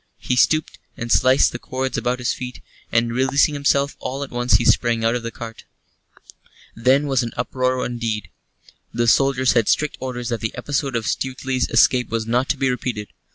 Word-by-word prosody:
He 125 - -2
stooped 155 +4 +2 0.2
and 120 0 -5
sliced 130 +1 +4
the 120 - -6
cords 130 +1 -3
about 125 +1 -1
his 125 -1 -1
feet, 125 -1 -7 0.3
and, 115 0 +1
releasing 135 +4 +2
himself, 140 0 +1
all 135 +2 -4
at 140 - -9
once 120 0 0
he - - +4
sprang 115 -2 +2
out 115 - +3
of 120 - -2
the 115 - -4
cart. 115 -1 -9 1.1
Then 130 +5 +2
was 135 -2 +1
an 120 -1 -4
uproar 130 0 -1
indeed. 115 -3 -3 0.6
The 120 0 0
soldiers 130 +1 +3
had 115 -4 +2
strict 150 -1 +1
orders 125 -2 -4
that 115 -1 -2
the 110 +1 -4
episode 135 0 -2
of 115 -2 -1
Stuteley's 130 +1 -2
escape 125 -1 +3
was 115 -1 -2
not 120 +4 0
to 140 - +1
be 135 - +1
repeated. 120 -4 -4
125 Hz, 190 wpm, -21 LUFS, 120-130 Hz, 1.1 s, sliced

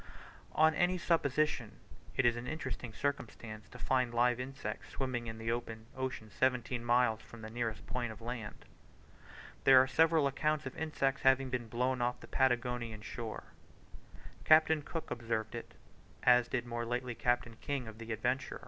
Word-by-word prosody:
On 155 0 +5
any 180 +3 +2
supposition 155 -3 +1 0.4
it 130 - +3
is 120 -1 +4
an 120 +1 -5
interesting 155 -6 -4
circumstance 115 -5 -4
to 125 - -11
find 125 -1 +1
live 120 0 +3
insects 135 +2 -5
swimming 130 -3 -3
in 115 0 -5
the 115 +1 -2
open 115 -2 -4
ocean 130 -5 -4
seventeen 125 -2 0
miles 120 -2 +3
from 115 -2 -12
the 110 - -7
nearest 115 -2 -3
point 120 -2 -2
of 110 - -10
land. 115 -2 -6 1.0
There 135 -1 +9
are 130 - +6
several 160 +3 +4
accounts 150 +2 0
of 135 - -6
insects 140 -4 -1
having 130 -1 +4
been 120 -2 -2
blown 125 +2 0
off 120 0 0
the - - -11
Patagonian 125 -4 0
shore. 110 0 -5 1.0
Captain 155 0 +6
Cook 160 +2 -6
observed 115 -2 -2
it, - - -7 0.5
as 125 -1 +6
did 120 -1 -2
more 120 0 -3
lately 125 +1 -2
Captain 120 -1 0
King 140 -4 -2
of 110 0 -10
the 115 0 -6
Adventure. 125 +5 -1
125 Hz, 165 wpm, -33 LUFS, 115-135 Hz, 1.0 s, There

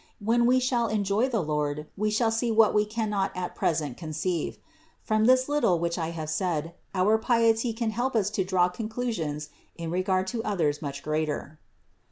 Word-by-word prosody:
When 235 +3 +2
we 255 +1 +5
shall 245 -2 +1
enjoy 210 +3 +1
the 225 -7 0
Lord 150 -1 -1
we 215 +2 0
shall 225 +1 +2
see 225 +2 0
what 220 -1 +5
we 210 0 +3
cannot 210 -3 -1
at 180 -1 -3
present 150 -6 -1
conceive. 160 +1 -3 0.5
From 215 0 +2
this 255 +1 +5
little 290 -12 +2
which 170 +1 -1
I 160 -1 -1
have 160 -2 -5
said, 165 -1 -1 0.2
our 205 +4 +3
piety 230 0 +2
can 225 0 -2
help 245 +4 -1
us 205 -2 +2
to 200 -2 0
draw 185 -1 +2
conclusions 180 -7 -3 0.3
in 165 -1 -5
regard 185 +1 +1
to 225 -2 -2
others 160 -9 0
much 140 -2 -5
greater. 155 0 -2
195 Hz, 180 wpm, -27 LUFS, 160-225 Hz, 0.5 s, we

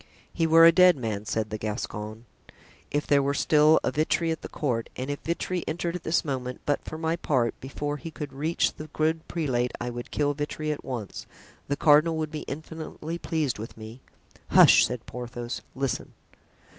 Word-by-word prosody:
("He 165 -2 +1
were 165 +1 +8
a 165 - +9
dead 180 -1 +6
man" 110 -4 -3
said 110 -1 -2
the 110 - -3
Gascon, 105 +1 -5 0.6
"if 145 +1 -1
there 140 -1 +4
were 140 +1 0
still 155 +2 +5
a - - +1
Vitry 160 +2 +1
at 160 - -3
the - - -7
court 120 -6 -2
and 130 +3 -3
if 145 - -4
Vitry 170 +1 -2
entered 170 +2 -2
at 180 - -4
this 165 0 0
moment; 125 -3 -3
but 145 - 0
for 155 - -7
my 160 +1 0
part, 125 -8 +1
before 145 +2 -4
he 165 - -7
could 150 -3 -7
reach 155 +5 0
the 155 - -9
good 160 +1 -1
prelate 125 -7 -1
I 120 0 -3
would 120 0 -7
kill 145 -1 0
Vitry 150 +1 -3
at 150 - -5
once; 120 -6 -6 0.4
the 140 - -1
cardinal 155 +2 +5
would 155 -1 -2
be 155 -2 -5
infinitely 160 +2 -6
pleased 155 -10 -1
with 110 +1 -8
me." 110 +3 -10 0.5
"Hush!" - - +7
said 125 -2 -6
Porthos; 120 0 -6
"listen.") 135 -2 -2
145 Hz, 190 wpm, -27 LUFS, 125-160 Hz, 0.6 s, a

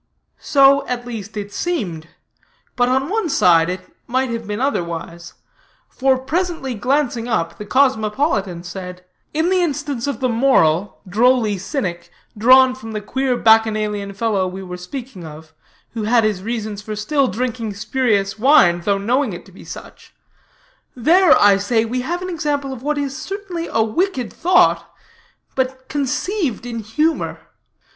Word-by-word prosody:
So, 275 -1 +4
at 245 -1 -3
least, 220 -3 -7
it 205 0 -6
seemed; 180 - -3 0.7
but 245 -1 +2
on 265 +2 +1
one 425 -1 -1
side 170 - +4
it 185 +1 -3 0.3
might 255 +1 0
have 230 -2 -5
been 210 +1 -3
otherwise: 170 -8 -3 0.5
for 265 0 +1
presently 310 0 -2
glancing 245 +1 0
up, 165 -8 -2
the 210 - -7
cosmopolitan 215 - +1
said: 180 0 -8 0.3
"In 320 +4 0
the 370 -1 +3
instance 290 -6 -2
of 280 -6 -3
the 255 - +1
moral, 215 -8 +2
drolly 220 0 +2
cynic, 185 -4 -4 0.3
drawn 255 +4 +6
from 225 -4 -9
the 215 - -2
queer 260 +3 -1
bacchanalian 215 -3 +2
fellow 205 -3 0
we 190 +1 -7
were 180 -1 -7
speaking 200 +2 -8
of, 160 0 -11 0.4
who 225 -2 -4
had 230 +1 +3
his 210 -4 0
reasons 215 -1 -4
for 215 0 -6
still 270 +6 +1
drinking 230 -2 -3
spurious 215 -2 0
wine, 210 - +5
though 200 +2 +1
knowing 240 +3 0
it 175 - -9
to 195 - -17
be 190 - -14
such - - -11 0.8
there, 335 +8 +5
I 205 -1 +6
say, 225 +3 +1
we 250 +3 -2
have 345 +7 -3
an 370 - -4
example 290 -4 -2
of 245 - -9
what 295 +2 -1
is 280 -2 -2
certainly 375 +1 -5
a 225 - +2
wicked 260 - -1
thought, 355 +2 +3 0.6
but 260 0 -3
conceived 290 - -2
in 235 -1 -4
humor. 300 +10 -1
235 Hz, 155 wpm, -19 LUFS, 200-275 Hz, 0.8 s, drawn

